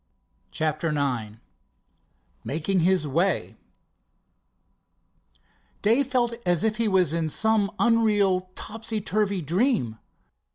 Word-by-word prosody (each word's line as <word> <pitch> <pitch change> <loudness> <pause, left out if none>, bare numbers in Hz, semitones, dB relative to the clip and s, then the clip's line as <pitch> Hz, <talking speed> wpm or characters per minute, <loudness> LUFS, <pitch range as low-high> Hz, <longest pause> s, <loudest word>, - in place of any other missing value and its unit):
CHAPTER 155 +1 -2
IX 125 -8 -2 1.1
MAKING 165 +6 -1
HIS 175 -2 +2
WAY 170 +6 0 2.3
Dave 240 +6 +3
felt 245 -3 0
as 175 +1 +1
if 215 -1 0
he 230 -1 +1
was 185 -6 +2
in 165 -1 -1
some 220 +3 +2
unreal, 205 -4 +2
topsy 220 0 -4
turvy 200 -1 -1
dream. 165 - 0
190 Hz, 95 wpm, -25 LUFS, 160-220 Hz, 2.3 s, Dave